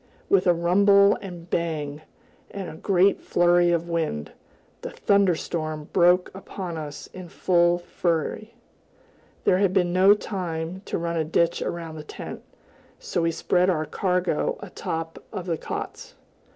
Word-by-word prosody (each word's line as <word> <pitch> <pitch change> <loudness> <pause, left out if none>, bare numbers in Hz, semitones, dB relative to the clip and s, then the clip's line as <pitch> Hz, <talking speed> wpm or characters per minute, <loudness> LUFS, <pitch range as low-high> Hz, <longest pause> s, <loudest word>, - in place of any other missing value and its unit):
With 190 -2 +3
a 175 - +6
rumble 200 +4 +5
and 175 -3 -9
bang, 155 -4 -2 0.5
and 195 -2 -6
a - - -7
great 190 +3 +2
flurry 175 0 +3
of 170 0 0
wind, 160 - -2 0.5
the - - -5
thunder 200 -3 +2
storm 155 -2 -4
broke 180 0 +4
upon 190 -2 -6
us 150 -2 -6
in 185 -2 -9
full 175 0 +2
fury. 175 +4 -2 0.9
There 185 - +3
had 195 -2 +2
been 180 -2 +2
no 190 +3 +6
time 180 -3 -4
to - - -2
run 170 0 -2
a 160 - +1
ditch 165 +2 +1
around 165 -2 -4
the 155 - -7
tent, - - -8 0.6
so 175 - -2
we 165 - +2
spread 180 +2 +1
our 155 -4 0
cargo 180 0 0
atop 165 0 -5
of 180 - -5
the 170 -3 -1
cots. - - -6
175 Hz, 150 wpm, -25 LUFS, 165-185 Hz, 0.9 s, a